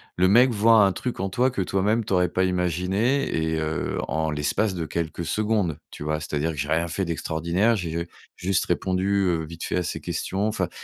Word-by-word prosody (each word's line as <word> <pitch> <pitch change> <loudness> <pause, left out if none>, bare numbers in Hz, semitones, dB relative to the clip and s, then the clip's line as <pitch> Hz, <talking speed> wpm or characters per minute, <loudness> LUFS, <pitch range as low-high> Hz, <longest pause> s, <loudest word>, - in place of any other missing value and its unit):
le 90 +1 +3
mec 125 +5 +6
voit 110 -1 +5
un 95 - +2
truc 125 +6 -4
en 95 - -1
toi 125 +6 +2
que 100 - -2
toi 95 +1 0
même 110 +3 +1
t'aurais 90 -3 +2
pas 95 +2 +1
imaginé 90 - 0
et 80 0 0
heu, 80 +2 -2
en 80 +1 -1
l'espace 75 +8 0
de 85 -3 -3
quelques 85 +1 -3
secondes, 105 -4 0
tu - - -8
vois? 75 0 -1
C'est-à-dire 75 +2 -1
que 75 - -8
j'ai 70 +2 -2
rien 85 +1 +1
fait 95 +4 -2
d'extraordinaire. 85 +6 0
J'ai, 85 -4 -3
heu, 85 0 -3 0.3
juste 95 +1 0
répondu, 95 +2 0
heu, 85 -3 +1
vite 80 +1 -7
fait - - -2
à 90 - +1
ces - - -4
questions. 100 +3 -2
Enfin, 110 - -1
90 Hz, 215 wpm, -24 LUFS, 80-100 Hz, 0.3 s, mec